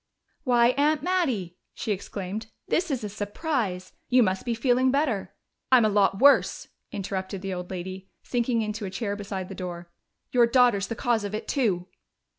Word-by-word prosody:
"Why, 240 Hz, -2 st, +5 dB
Aunt 295 Hz, 0 st, +2 dB
Mattie!" 260 Hz, -, 0 dB, 0.2 s
she 220 Hz, -, -3 dB
exclaimed. 200 Hz, +2 st, -4 dB, 0.2 s
"This 355 Hz, +1 st, +1 dB
is 265 Hz, -6 st, -2 dB
a -, -, -2 dB
surprise. 205 Hz, -, -3 dB, 0.2 s
You 250 Hz, 0 st, +6 dB
must 190 Hz, -2 st, -1 dB
be 235 Hz, -, +1 dB
feeling 255 Hz, +2 st, +3 dB
better 250 Hz, -9 st, 0 dB, 0.2 s
" -, -, -54 dB
"I'm 250 Hz, -4 st, +7 dB
a -, -, +4 dB
lot 200 Hz, -1 st, +3 dB
worse!" 280 Hz, +1 st, +4 dB, 0.2 s
interrupted 190 Hz, 0 st, -4 dB
the 195 Hz, -1 st, -3 dB
old 180 Hz, 0 st, -5 dB
lady, 185 Hz, +1 st, -6 dB
sinking 240 Hz, -2 st, 0 dB
into 215 Hz, 0 st, -4 dB
a -, -, -3 dB
chair 200 Hz, +1 st, -3 dB
beside 195 Hz, -2 st, -5 dB
the 195 Hz, -, -7 dB
door. 175 Hz, -2 st, -7 dB, 0.4 s
"Your 240 Hz, -2 st, +5 dB
daughter's 235 Hz, -5 st, +4 dB
the 230 Hz, -, -4 dB
cause 235 Hz, -3 st, +1 dB
of 205 Hz, +1 st, -3 dB
it, 215 Hz, -, -5 dB
too!" 200 Hz, -10 st, +1 dB
215 Hz, 180 wpm, -26 LUFS, 190-250 Hz, 0.4 s, I'm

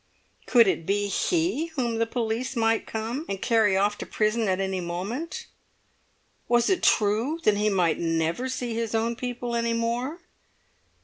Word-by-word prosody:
Could 235 Hz, -2 st, +6 dB
it 165 Hz, -4 st, -1 dB
be 205 Hz, +1 st, +1 dB
he 330 Hz, -, 0 dB
whom 235 Hz, -4 st, -1 dB
the 230 Hz, -, +1 dB
police 235 Hz, +2 st, -2 dB
might 225 Hz, -1 st, +1 dB
come 225 Hz, +6 st, -3 dB
and 195 Hz, -, -3 dB
carry 220 Hz, -5 st, +3 dB
off 205 Hz, +1 st, +1 dB
to -, -, -4 dB
prison 215 Hz, +1 st, 0 dB
at 185 Hz, 0 st, +1 dB
any 190 Hz, -1 st, -1 dB
moment? 190 Hz, -, -4 dB, 1.0 s
Was 240 Hz, +7 st, +3 dB
it 370 Hz, -, +1 dB
true 220 Hz, +9 st, +2 dB
that 210 Hz, -1 st, +3 dB
he 210 Hz, +1 st, +2 dB
might 180 Hz, -5 st, +1 dB
never 165 Hz, +9 st, 0 dB
see 250 Hz, -2 st, -3 dB
his 230 Hz, -1 st, -2 dB
own 230 Hz, +1 st, 0 dB
people 245 Hz, -1 st, -4 dB
any 235 Hz, 0 st, 0 dB
more? 240 Hz, +8 st, -2 dB
225 Hz, 165 wpm, -26 LUFS, 205-245 Hz, 1.0 s, Could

